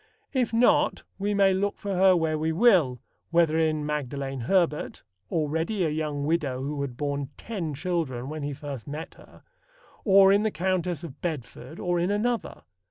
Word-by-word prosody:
If 250 -4 +1
not, 235 +2 +3 0.2
we 205 +1 0
may 195 -1 +4
look 200 +2 -1
for 200 -1 -4
her 185 0 +5
where 160 -1 0
we 160 +1 0
will, 165 - +4 0.3
whether 170 -2 +3
in 155 -2 +1
Magdalen 140 -2 -3
Herbert 165 +4 0 0.3
(already 160 +6 -1
a - - +1
young 150 -2 -2
widow 150 -5 0
who 145 +1 -3
had 130 -4 -4
borne 140 -1 -2
ten 175 -10 -4
children 150 -6 -2
when 155 +1 -5
he 145 0 -3
first 140 -4 -7
met 150 +3 -6
her) - - -18 0.6
or 195 -1 +6
in 200 - +4
the 220 - +1
Countess 180 -2 -1
of 150 -4 -9
Bedford 155 0 -5
or 175 -1 0
in 175 +2 +1
another. 225 - -1
160 Hz, 170 wpm, -26 LUFS, 145-190 Hz, 0.6 s, or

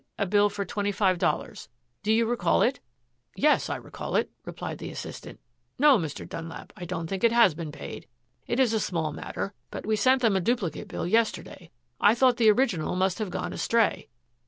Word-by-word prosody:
a 200 - 0
bill 205 +2 +3
for 200 -1 -4
twenty 205 +2 -2
five 190 -3 +1
dollars. - - -2 0.3
Do 210 - 0
you 230 +1 +3
recall 240 +1 +2
it?" 255 +2 +1 0.6
"Yes, 300 +1 +3
I - - -1
recall - - -6
it," - - +1
replied - - -6
the - - -6
assistant. - - -8 0.4
"No, 280 -3 +6
Mr. 160 -4 -5
Dunlap, 165 0 -8
I 175 - -7
don't 170 -1 -4
think 190 +5 -4
it 235 - +5
has 235 -7 +5
been 155 -1 -6
paid. 145 - -8 0.4
It 240 - -1
is 250 -4 +3
a 220 - +2
small 165 -6 -2
matter, 95 -7 -5 0.2
but - - -7
we 215 +1 +1
sent 255 +4 +3
them 220 -4 +4
a 190 - +2
duplicate 190 - -1
bill - - -4
yesterday. 200 -3 -1 0.3
I 210 +2 +5
thought 250 -1 +4
the 225 -3 +5
original 210 -9 +1
must 185 +2 0
have 215 -3 -2
gone - - -4
astray." 230 -2 +1
205 Hz, 200 wpm, -27 LUFS, 175-235 Hz, 0.6 s, No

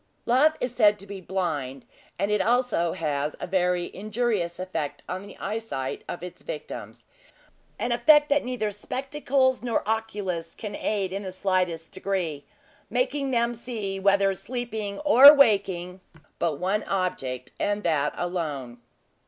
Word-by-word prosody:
Love 270 +6 +4
is 250 -1 -2
said 210 -3 +4
to 195 - -9
be 200 -1 -8
blind, 155 -8 -3 0.3
and 200 +3 0
it 210 -2 +2
also 230 -6 +1
has 150 -2 -2
a - - -3
very 180 -1 0
injurious 210 -4 -1
effect 150 -6 -4
on 185 +1 -4
the 200 - -12
eyesight 195 -11 -4
of 175 - -5
its 180 0 -8
victims - - -7 0.7
an 240 - -2
effect 295 +5 +5
that 290 0 +2
neither 245 -4 -2
spectacles 265 +4 0
nor 235 -4 -1
oculists 205 -6 -2
can 210 -2 -6
aid 195 -3 -1
in 195 - -3
the 190 -2 -5
slightest 180 -3 -1
degree, 180 -7 -2 0.5
making 290 - 0
them 235 -1 +1
see 220 -5 -5
whether 195 0 +3
sleeping 220 -1 -4
or 290 0 +10
waking, 190 -8 +2 0.4
but 165 -4 0
one 195 +5 0
object, 135 -10 -2
and 205 0 0
that 150 -3 +1
alone. 150 -9 -3
195 Hz, 145 wpm, -26 LUFS, 175-235 Hz, 0.7 s, or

